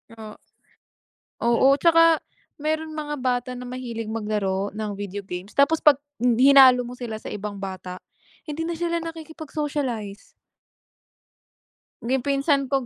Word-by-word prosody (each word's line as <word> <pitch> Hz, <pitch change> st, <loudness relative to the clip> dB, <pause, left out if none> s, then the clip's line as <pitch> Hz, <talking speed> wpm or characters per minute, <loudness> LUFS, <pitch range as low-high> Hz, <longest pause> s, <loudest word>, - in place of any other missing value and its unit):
O 215 Hz, -1 st, -9 dB, 1.1 s
oo, 235 Hz, +3 st, +4 dB
'tsaka 330 Hz, +1 st, +5 dB, 0.4 s
merong 315 Hz, +1 st, -2 dB
mga 295 Hz, -1 st, -4 dB
bata 250 Hz, -1 st, -1 dB
na 250 Hz, -, -7 dB
mahilig 240 Hz, -3 st, -5 dB
maglaro 210 Hz, -3 st, -2 dB
ng 210 Hz, 0 st, -4 dB
video 205 Hz, 0 st, -5 dB
games, 185 Hz, +2 st, -7 dB
tapos 310 Hz, +3 st, +4 dB
pag 295 Hz, -3 st, +7 dB, 0.3 s
i 250 Hz, +3 st, +5 dB
hinalo 255 Hz, -3 st, +7 dB
mo 245 Hz, -, -8 dB
sila 235 Hz, -3 st, -6 dB
sa -, -, -10 dB
ibang 205 Hz, 0 st, -5 dB
bata, 185 Hz, -1 st, -6 dB, 0.5 s
hindi 305 Hz, +2 st, -4 dB
na 335 Hz, 0 st, -3 dB
sila 340 Hz, 0 st, -1 dB
nakikipag-socialize. 295 Hz, -9 st, -5 dB, 1.8 s
Yung 255 Hz, +1 st, +1 dB
pinsan 275 Hz, -1 st, +1 dB
ko 270 Hz, -2 st, 0 dB
255 Hz, 130 wpm, -24 LUFS, 215-300 Hz, 1.8 s, pag